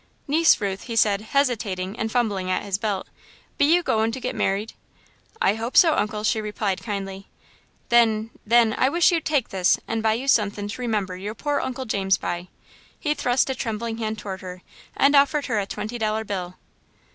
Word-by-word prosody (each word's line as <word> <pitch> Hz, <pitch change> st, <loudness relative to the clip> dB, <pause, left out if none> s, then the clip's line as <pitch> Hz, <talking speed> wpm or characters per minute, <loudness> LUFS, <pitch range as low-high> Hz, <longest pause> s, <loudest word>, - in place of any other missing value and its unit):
"Niece 320 Hz, +3 st, +4 dB
Ruth," 200 Hz, -2 st, -3 dB
he 230 Hz, -, -5 dB
said, 205 Hz, -2 st, +3 dB
hesitating 220 Hz, -6 st, -1 dB
and 225 Hz, -1 st, -2 dB
fumbling 205 Hz, -7 st, 0 dB
at 185 Hz, -, 0 dB
his 200 Hz, -1 st, -2 dB
belt, 205 Hz, -3 st, -2 dB, 0.5 s
"be 285 Hz, -, +5 dB
you 345 Hz, +4 st, +4 dB
goin' 220 Hz, -4 st, +1 dB
to 260 Hz, -, -5 dB
get -, -, -3 dB
merried?" 200 Hz, +3 st, -1 dB, 0.7 s
"I 195 Hz, -, +3 dB
hope 225 Hz, +3 st, -3 dB
so, 330 Hz, -3 st, +7 dB
Uncle," 210 Hz, 0 st, -1 dB
she 220 Hz, +1 st, +1 dB
replied 210 Hz, -2 st, -2 dB
kindly. 195 Hz, -2 st, -5 dB, 0.6 s
"Then 225 Hz, -2 st, +3 dB
then 230 Hz, 0 st, +4 dB
I 260 Hz, -, +4 dB
wish 345 Hz, +4 st, +4 dB
you'd 330 Hz, -2 st, 0 dB
take 290 Hz, -6 st, +1 dB
this 185 Hz, -2 st, +2 dB
and 225 Hz, 0 st, -1 dB
buy 220 Hz, 0 st, +2 dB
you 250 Hz, +5 st, -4 dB
sunthin' 205 Hz, -4 st, +1 dB
to 230 Hz, -, -6 dB
remember 210 Hz, -6 st, -1 dB
your 205 Hz, +4 st, -6 dB
pore 290 Hz, +3 st, -1 dB
old -, -, -2 dB
Uncle 260 Hz, 0 st, -5 dB
James 195 Hz, -4 st, +1 dB
by." 175 Hz, +1 st, -4 dB, 0.5 s
He 295 Hz, -, 0 dB
thrust 255 Hz, -1 st, +1 dB
a -, -, 0 dB
trembling 230 Hz, -1 st, -4 dB
hand 220 Hz, -1 st, -2 dB
toward 190 Hz, -3 st, -6 dB
her, 180 Hz, -1 st, -9 dB, 0.3 s
and 280 Hz, +1 st, +4 dB
offered 285 Hz, +1 st, +4 dB
her 225 Hz, -5 st, 0 dB
a 195 Hz, -, -3 dB
twenty 215 Hz, +4 st, -5 dB
dollar 220 Hz, 0 st, 0 dB
bill. 185 Hz, -4 st, -5 dB
220 Hz, 195 wpm, -24 LUFS, 200-245 Hz, 0.7 s, so